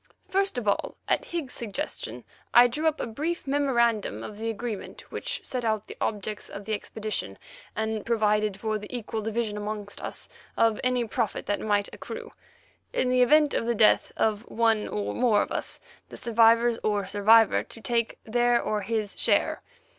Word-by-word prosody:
First 390 Hz, -5 st, 0 dB
of 235 Hz, -4 st, -3 dB
all, 200 Hz, -, 0 dB
at -, -, +1 dB
Higgs's 325 Hz, -7 st, -4 dB
suggestion 240 Hz, +7 st, -4 dB, 0.3 s
I 240 Hz, +1 st, +10 dB
drew 300 Hz, +7 st, -1 dB
up 315 Hz, 0 st, +1 dB
a -, -, -1 dB
brief 305 Hz, +10 st, -3 dB
memorandum 235 Hz, -, +1 dB
of 210 Hz, -, -8 dB
agreement 225 Hz, -1 st, -4 dB
which -, -, -4 dB
set 250 Hz, -2 st, -2 dB
out 220 Hz, -2 st, 0 dB
the -, -, -9 dB
objects 210 Hz, 0 st, -2 dB
of 200 Hz, 0 st, -8 dB
the 220 Hz, -, -2 dB
expedition, 210 Hz, -, -4 dB, 0.4 s
and 220 Hz, -1 st, -2 dB
provided 210 Hz, -3 st, +1 dB
for 215 Hz, -1 st, -1 dB
the 210 Hz, -, -9 dB
equal 225 Hz, -3 st, -4 dB
division 220 Hz, -1 st, -2 dB
amongst 210 Hz, -1 st, -5 dB
us -, -, -5 dB, 0.3 s
of 225 Hz, -2 st, +3 dB
any 250 Hz, -1 st, +1 dB
profit 225 Hz, -2 st, -2 dB
that 205 Hz, -, 0 dB
might 205 Hz, -1 st, +1 dB
accrue; -, -, -7 dB, 0.6 s
in 375 Hz, -, +1 dB
the 255 Hz, 0 st, +4 dB
event 295 Hz, +3 st, +5 dB
of 230 Hz, -, 0 dB
the 235 Hz, -, +1 dB
death 215 Hz, 0 st, +4 dB
of 215 Hz, -2 st, +1 dB
one 225 Hz, -2 st, +2 dB
or 105 Hz, 0 st, -3 dB
more 210 Hz, -, +3 dB
of -, -, -9 dB
us, -, -, -3 dB, 0.3 s
the -, -, -9 dB
survivors 230 Hz, 0 st, +4 dB
or 205 Hz, -2 st, 0 dB
survivor 215 Hz, +2 st, +5 dB
to -, -, -12 dB
take 230 Hz, 0 st, -1 dB
their 240 Hz, +1 st, +3 dB
or 210 Hz, -1 st, -1 dB
his 215 Hz, 0 st, -2 dB
share. -, -, +2 dB
225 Hz, 175 wpm, -27 LUFS, 210-240 Hz, 0.6 s, I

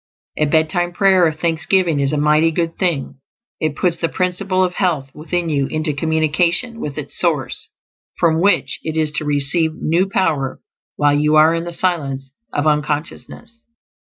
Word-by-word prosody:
A 155 Hz, -, +1 dB
bedtime 160 Hz, +3 st, +1 dB
prayer 190 Hz, -2 st, +4 dB
of 155 Hz, 0 st, -4 dB
thanksgiving 170 Hz, 0 st, +1 dB
is 140 Hz, 0 st, +1 dB
a 150 Hz, -, 0 dB
mighty 150 Hz, +2 st, +3 dB
good 165 Hz, 0 st, -2 dB
thing; 145 Hz, -7 st, -1 dB, 0.4 s
it 155 Hz, -2 st, -1 dB
puts 175 Hz, 0 st, 0 dB
the 165 Hz, 0 st, -1 dB
Principle 185 Hz, +1 st, 0 dB
of 180 Hz, -1 st, 0 dB
Health 160 Hz, -9 st, -1 dB
within 170 Hz, +3 st, -3 dB
you 140 Hz, -4 st, 0 dB
into 155 Hz, -1 st, -2 dB
communication 160 Hz, -, 0 dB
with 150 Hz, -8 st, -5 dB
its 145 Hz, -2 st, -7 dB
source, 150 Hz, -8 st, -1 dB, 0.5 s
from 165 Hz, -1 st, +2 dB
which 200 Hz, +2 st, +1 dB
it 160 Hz, 0 st, -4 dB
is 155 Hz, -1 st, +1 dB
to 155 Hz, -, -2 dB
receive 150 Hz, +3 st, 0 dB
new 175 Hz, +5 st, 0 dB
power 155 Hz, -9 st, 0 dB, 0.4 s
while 145 Hz, -1 st, +3 dB
you 150 Hz, +1 st, +2 dB
are 155 Hz, +1 st, +6 dB
in 165 Hz, 0 st, -2 dB
the 175 Hz, -, -5 dB
silence 140 Hz, -7 st, -2 dB, 0.2 s
of 145 Hz, -, -1 dB
unconsciousness. 150 Hz, +9 st, -3 dB
160 Hz, 165 wpm, -19 LUFS, 150-175 Hz, 0.5 s, are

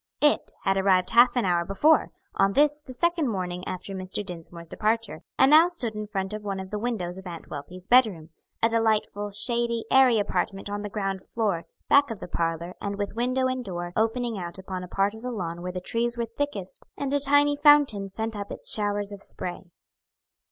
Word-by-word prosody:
"It" 295 Hz, -, +2 dB
had 195 Hz, -1 st, +2 dB
arrived 190 Hz, -1 st, +3 dB
half 240 Hz, +2 st, +6 dB
an 245 Hz, -4 st, +1 dB
hour 175 Hz, -2 st, +2 dB
before, 290 Hz, -, +3 dB, 0.2 s
on 195 Hz, 0 st, +2 dB
this 295 Hz, +3 st, +4 dB
the 265 Hz, -, -11 dB
second 340 Hz, +3 st, 0 dB
morning 180 Hz, -4 st, -3 dB
after 185 Hz, +2 st, -5 dB
Mr. 190 Hz, +2 st, -4 dB
Dinsmore's 170 Hz, -2 st, -6 dB
departure, 225 Hz, +5 st, -1 dB, 0.2 s
and 265 Hz, +2 st, +5 dB
now 320 Hz, +3 st, +8 dB
stood 265 Hz, -11 st, -3 dB
in 210 Hz, 0 st, -5 dB
front 195 Hz, -1 st, -3 dB
of 215 Hz, -, -5 dB
one 200 Hz, -2 st, -4 dB
of 190 Hz, 0 st, -8 dB
the 210 Hz, -, -2 dB
windows 190 Hz, -6 st, -3 dB
of 190 Hz, -, -10 dB
Aunt 170 Hz, -2 st, -9 dB
Wealthy's 180 Hz, +6 st, -7 dB
bedroom 210 Hz, -11 st, +3 dB, 0.3 s
a 230 Hz, -, +5 dB
delightfully 215 Hz, -2 st, 0 dB
shady, 235 Hz, +2 st, 0 dB
airy 260 Hz, -3 st, +6 dB
apartment 205 Hz, -1 st, -2 dB
on 205 Hz, 0 st, -3 dB
the 205 Hz, -, -5 dB
ground 195 Hz, -2 st, -3 dB
floor, 205 Hz, -7 st, -2 dB, 0.2 s
back 280 Hz, -1 st, +5 dB
of 225 Hz, -4 st, -5 dB
the -, -, -7 dB
parlor, 170 Hz, +1 st, -2 dB
and 200 Hz, 0 st, -3 dB
with 205 Hz, -1 st, -3 dB
window 255 Hz, +3 st, 0 dB
and 255 Hz, -1 st, -1 dB
door 175 Hz, -4 st, -5 dB
opening 225 Hz, 0 st, 0 dB
out 175 Hz, 0 st, -6 dB
upon 185 Hz, -1 st, -6 dB
a -, -, -7 dB
part 195 Hz, +3 st, 0 dB
of 220 Hz, -, -11 dB
the 250 Hz, -, -4 dB
lawn 175 Hz, -7 st, -4 dB
where 180 Hz, +1 st, -4 dB
the 180 Hz, -, -4 dB
trees 235 Hz, +5 st, -1 dB
were 235 Hz, -, -1 dB
thickest 230 Hz, -5 st, -5 dB
and 280 Hz, -1 st, -2 dB
a 285 Hz, -, +3 dB
tiny 285 Hz, +1 st, +4 dB
fountain 285 Hz, -9 st, +4 dB
sent 220 Hz, +3 st, -4 dB
up 200 Hz, -1 st, -6 dB
its -, -, -2 dB
showers 205 Hz, -1 st, +1 dB
of 200 Hz, -1 st, -8 dB
spray. 180 Hz, -2 st, -3 dB
205 Hz, 210 wpm, -26 LUFS, 190-240 Hz, 0.3 s, now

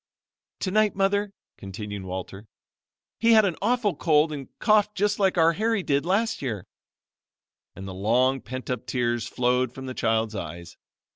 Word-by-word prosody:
"Tonight, 210 Hz, +2 st, +1 dB
Mother," 200 Hz, +1 st, +1 dB, 0.3 s
continued 100 Hz, +1 st, -6 dB
Walter, 95 Hz, +3 st, -7 dB, 0.7 s
"he 230 Hz, 0 st, +5 dB
had 220 Hz, -2 st, +6 dB
an 185 Hz, -4 st, 0 dB
awful 215 Hz, -3 st, +1 dB
cold 155 Hz, 0 st, +3 dB
and 140 Hz, -3 st, -6 dB
coughed 210 Hz, -1 st, +3 dB
just 205 Hz, +2 st, 0 dB
like 190 Hz, -2 st, +2 dB
our 165 Hz, 0 st, +5 dB
Harry 220 Hz, +1 st, 0 dB
did 140 Hz, +1 st, 0 dB
last 220 Hz, +5 st, +1 dB
year," 110 Hz, -9 st, -4 dB, 1.1 s
and 95 Hz, 0 st, -8 dB
the 95 Hz, -, -6 dB
long 125 Hz, +7 st, +2 dB
pent 130 Hz, -1 st, -6 dB
up 125 Hz, 0 st, -4 dB
tears 120 Hz, -2 st, -1 dB
flowed 125 Hz, 0 st, +1 dB
from 130 Hz, -, -7 dB
the 130 Hz, -, -5 dB
child's 110 Hz, -2 st, 0 dB
eyes. 85 Hz, -3 st, -7 dB
135 Hz, 155 wpm, -25 LUFS, -, 1.1 s, had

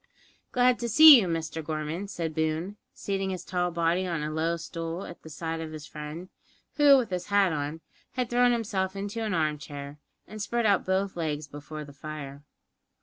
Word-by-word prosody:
"Glad 250 Hz, 0 st, +3 dB
to 235 Hz, -, -2 dB
see 300 Hz, +1 st, +10 dB
you, 190 Hz, -, -1 dB
Mr 165 Hz, -1 st, -3 dB
Gorman," 155 Hz, +5 st, -3 dB
said 165 Hz, -5 st, -4 dB
Boone, 160 Hz, +5 st, -2 dB
seating 195 Hz, -1 st, -3 dB
his 185 Hz, -2 st, -5 dB
tall 180 Hz, -1 st, 0 dB
body 170 Hz, +2 st, 0 dB
on 165 Hz, -4 st, -2 dB
a 150 Hz, -, -3 dB
low 165 Hz, +2 st, 0 dB
stool 165 Hz, +1 st, -5 dB
at 175 Hz, -, -10 dB
the 160 Hz, -, -11 dB
side 165 Hz, +1 st, -4 dB
of 160 Hz, -1 st, -6 dB
his 155 Hz, -1 st, -8 dB
friend, 155 Hz, +5 st, -8 dB, 0.5 s
who, 290 Hz, -2 st, +7 dB
with 240 Hz, -6 st, -1 dB
his 180 Hz, -1 st, -3 dB
hat 200 Hz, -4 st, +3 dB
on, 150 Hz, +2 st, -3 dB, 0.3 s
had 250 Hz, -1 st, -1 dB
thrown 245 Hz, +1 st, +3 dB
himself 200 Hz, -5 st, -1 dB
into 205 Hz, +3 st, -4 dB
an 210 Hz, -4 st, -1 dB
armchair, 150 Hz, -2 st, -3 dB, 0.3 s
and 215 Hz, 0 st, -8 dB
spread 235 Hz, +2 st, -1 dB
out 200 Hz, -2 st, +3 dB
both 190 Hz, +1 st, 0 dB
legs 155 Hz, -3 st, -3 dB
before 150 Hz, +1 st, -8 dB
the 145 Hz, -, -13 dB
fire. 140 Hz, -1 st, -8 dB
170 Hz, 190 wpm, -28 LUFS, 155-200 Hz, 0.5 s, see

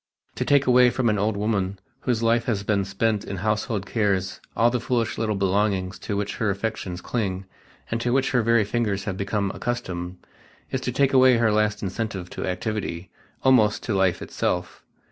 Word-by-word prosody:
To -, -, -2 dB
take 140 Hz, -1 st, +4 dB
away 125 Hz, 0 st, +6 dB
from 120 Hz, -1 st, +1 dB
an 105 Hz, -1 st, +1 dB
old 105 Hz, +1 st, 0 dB
woman 100 Hz, -2 st, -1 dB, 0.2 s
whose 120 Hz, -3 st, -1 dB
life 115 Hz, +1 st, +2 dB
has 105 Hz, -5 st, -1 dB
been 100 Hz, -1 st, +1 dB
spent 105 Hz, +1 st, 0 dB
in 100 Hz, -, -5 dB
household 105 Hz, +1 st, -1 dB
cares 100 Hz, -4 st, -1 dB, 0.2 s
all 115 Hz, +1 st, +4 dB
the 125 Hz, -, 0 dB
foolish 120 Hz, -1 st, -1 dB
little 110 Hz, -2 st, 0 dB
belongings 95 Hz, -1 st, 0 dB
to 105 Hz, -, -3 dB
which 100 Hz, 0 st, -3 dB
her 110 Hz, -, 0 dB
affections 100 Hz, -3 st, -3 dB
cling 95 Hz, -4 st, -2 dB, 0.5 s
and 115 Hz, 0 st, -1 dB
to 120 Hz, -, 0 dB
which 135 Hz, +1 st, +2 dB
her 125 Hz, -, +3 dB
very 115 Hz, 0 st, +3 dB
fingers 105 Hz, -2 st, -1 dB
have 100 Hz, -2 st, -3 dB
become 100 Hz, 0 st, -1 dB
accustomed, 90 Hz, -7 st, -4 dB, 0.5 s
is 130 Hz, -, -1 dB
to 125 Hz, -, -2 dB
take 135 Hz, +2 st, +2 dB
away 130 Hz, -2 st, +6 dB
her 115 Hz, -2 st, +3 dB
last 105 Hz, +1 st, +1 dB
incentive 95 Hz, -2 st, -4 dB
to -, -, -4 dB
activity, 90 Hz, -2 st, -3 dB, 0.3 s
almost 115 Hz, -6 st, +4 dB
to 110 Hz, -, -2 dB
life 95 Hz, -2 st, +1 dB
itself. 90 Hz, 0 st, -3 dB
105 Hz, 185 wpm, -24 LUFS, 95-115 Hz, 0.5 s, away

